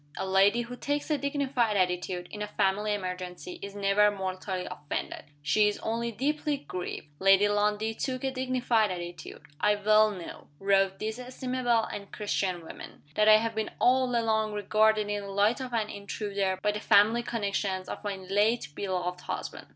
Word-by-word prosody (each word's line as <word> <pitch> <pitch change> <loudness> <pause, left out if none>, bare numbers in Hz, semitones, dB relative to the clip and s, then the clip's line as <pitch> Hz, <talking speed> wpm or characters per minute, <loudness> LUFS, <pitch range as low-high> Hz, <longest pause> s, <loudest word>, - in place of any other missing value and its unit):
A - - -2
lady 195 +4 +4
who 245 +1 -8
takes 290 +4 -2
a 300 - +3
dignified 275 -6 0
attitude, 180 -1 -1
in 210 - -7
a 210 - -2
family 205 0 0
emergency, 180 -2 -6
is 200 0 -7
never 200 +1 +4
mortally 185 -1 -4
offended 150 -5 -5 0.2
she 210 +8 +4
is 210 - -1
only 235 +1 -1
deeply 295 +5 -1
grieved. 180 - -6
Lady 195 +1 +5
Lundie 210 +1 +1
took 255 +3 -3
a 265 - 0
dignified 255 -4 +1
attitude. 175 -1 -7 0.2
"I 210 0 +3
well 215 +1 +4
know," 185 -5 -8
wrote 195 0 +2
this 220 +2 -4
estimable 250 -2 0
and 200 -2 -7
Christian 185 -4 -2
woman, - - -10
"that 215 0 +4
I 215 - +9
have 225 +1 -1
been 220 0 -2
all 255 0 +3
along 220 -2 +1
regarded 215 +1 +2
in 205 0 -2
the 200 - -8
light 205 +6 +2
of 255 -1 -5
an 220 -2 -1
intruder 200 -1 -2
by 210 - +3
the 210 - -4
family 210 +4 +4
connections 200 -5 -2
of - - -6
my 205 -1 -2
late 200 +1 +1
beloved 180 -1 -3
husband. - - -6
210 Hz, 175 wpm, -28 LUFS, 195-230 Hz, 0.2 s, I